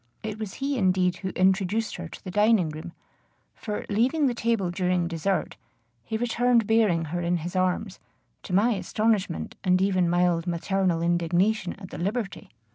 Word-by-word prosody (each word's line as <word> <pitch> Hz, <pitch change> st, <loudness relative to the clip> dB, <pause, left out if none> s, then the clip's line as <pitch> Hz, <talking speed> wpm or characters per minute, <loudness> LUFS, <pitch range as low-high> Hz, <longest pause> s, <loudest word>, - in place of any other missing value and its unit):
It 215 Hz, 0 st, -5 dB
was 215 Hz, -3 st, -5 dB
he 275 Hz, -1 st, -2 dB
indeed 185 Hz, -2 st, +2 dB
who 190 Hz, -, -4 dB
introduced 190 Hz, +4 st, +1 dB
her 175 Hz, -1 st, -6 dB
to -, -, -12 dB
the 185 Hz, -, -6 dB
dining 210 Hz, -3 st, +3 dB
room; 155 Hz, +3 st, -7 dB, 0.6 s
for, 210 Hz, -1 st, -5 dB
leaving 255 Hz, +9 st, +2 dB
the 255 Hz, -, +2 dB
table 230 Hz, -6 st, 0 dB
during 180 Hz, -1 st, 0 dB
dessert, 175 Hz, +3 st, -2 dB, 0.5 s
he 220 Hz, -, -3 dB
returned 240 Hz, 0 st, +2 dB
bearing 205 Hz, -7 st, +2 dB
her 175 Hz, -, -1 dB
in 175 Hz, +1 st, +1 dB
his 175 Hz, +3 st, -6 dB
arms, 185 Hz, +2 st, 0 dB, 0.4 s
to -, -, -9 dB
my 205 Hz, +6 st, +3 dB
astonishment, 210 Hz, -3 st, -1 dB
and 185 Hz, -2 st, +3 dB
even 185 Hz, -2 st, +2 dB
mild 175 Hz, -1 st, +2 dB
maternal 175 Hz, 0 st, 0 dB
indignation 175 Hz, +4 st, +1 dB
at 190 Hz, -2 st, -12 dB
the -, -, -7 dB
liberty. 200 Hz, +1 st, -3 dB
190 Hz, 165 wpm, -26 LUFS, 175-220 Hz, 0.6 s, dining